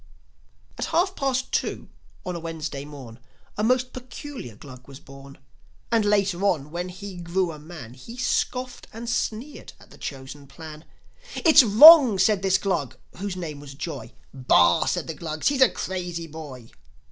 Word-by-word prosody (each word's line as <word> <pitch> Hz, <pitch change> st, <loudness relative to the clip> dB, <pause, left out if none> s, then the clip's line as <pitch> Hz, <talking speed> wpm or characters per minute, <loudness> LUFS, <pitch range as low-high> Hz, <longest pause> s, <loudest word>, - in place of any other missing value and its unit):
At -, -, -1 dB
half 375 Hz, +3 st, 0 dB
past 260 Hz, -2 st, -1 dB
two -, -, -2 dB, 0.4 s
on 180 Hz, -1 st, -4 dB
a -, -, -4 dB
Wednesday 160 Hz, -4 st, -6 dB
morn 130 Hz, -5 st, -11 dB, 0.4 s
A 210 Hz, -, -2 dB
most 255 Hz, +2 st, +1 dB
peculiar 255 Hz, -, -9 dB
Glug 130 Hz, +2 st, -13 dB
was 135 Hz, -1 st, -12 dB
born; 135 Hz, 0 st, -14 dB, 0.5 s
And 230 Hz, -2 st, +3 dB
later 200 Hz, -3 st, +1 dB
on, 150 Hz, -7 st, 0 dB
when 175 Hz, +2 st, -4 dB
he 190 Hz, +1 st, -9 dB
grew 175 Hz, +1 st, -1 dB
a 155 Hz, -, -10 dB
man, 150 Hz, -7 st, -11 dB
He 230 Hz, -, -12 dB
scoffed 255 Hz, 0 st, -2 dB
and 230 Hz, +2 st, -8 dB
sneered 240 Hz, +4 st, -4 dB
at -, -, -19 dB
the -, -, -16 dB
Chosen 140 Hz, +1 st, -8 dB
Plan. 155 Hz, +2 st, -11 dB, 0.5 s
"It's 315 Hz, -3 st, +7 dB
wrong!" 255 Hz, +1 st, +9 dB
said 195 Hz, +1 st, +2 dB
this 195 Hz, -1 st, +2 dB
Glug, 170 Hz, -9 st, -2 dB, 0.2 s
whose 195 Hz, 0 st, -4 dB
name 160 Hz, -5 st, -6 dB
was 140 Hz, -1 st, -11 dB
Joi. 160 Hz, +3 st, -7 dB, 0.2 s
"Bah!" 90 Hz, -10 st, +3 dB
said -, -, -1 dB
the -, -, -5 dB
Glugs. 155 Hz, -, -2 dB
"He's 280 Hz, -2 st, -1 dB
a 260 Hz, -, +7 dB
crazy 175 Hz, -3 st, -5 dB
boy!" 145 Hz, -7 st, -10 dB
175 Hz, 165 wpm, -24 LUFS, 145-225 Hz, 0.5 s, wrong